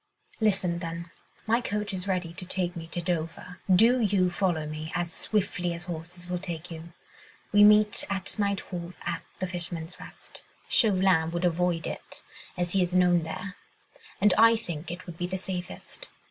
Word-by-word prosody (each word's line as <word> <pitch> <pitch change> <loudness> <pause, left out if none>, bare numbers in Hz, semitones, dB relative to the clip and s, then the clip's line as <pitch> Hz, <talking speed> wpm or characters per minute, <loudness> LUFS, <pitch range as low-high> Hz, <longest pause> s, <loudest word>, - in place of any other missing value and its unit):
"Listen, 190 -5 +2
then. 170 0 -5 0.3
My 230 +2 +3
coach 210 -2 -2
is 185 +1 -3
ready 180 -3 -1
to 175 - -1
take 180 -1 -1
me 165 -1 -6
to 175 +1 -3
Dover. 170 +1 -3
Do 230 +7 +6
you 195 -4 +3
follow 175 -4 0
me, 155 +1 -5
as 175 -1 -1
swiftly 180 -4 0
as 170 - -7
horses 175 +1 -7
will 180 0 -2
take 175 -1 -6
you. 165 +1 -8 0.6
We 205 0 +7
meet 210 0 +6
at 195 +1 -1
nightfall 190 -3 -2
at 170 -1 -2 0.2
'The 185 - -2
Fisherman's 175 -2 -3
Rest.' - - -9 0.3
Chauvelin 185 -7 +4
would 170 +2 -1
avoid 175 -1 +1
it, - - -7 0.3
as 175 -1 0
he 195 - +3
is 180 0 0
known 180 -1 +5
there, 185 +5 -6 0.6
and 205 -1 +5
I 230 +1 +8
think 175 -8 -5
it 175 +1 -6
would 170 -2 -9
be 175 - -1
the 190 +1 -2
safest. 185 - -6
180 Hz, 175 wpm, -28 LUFS, 170-195 Hz, 0.6 s, I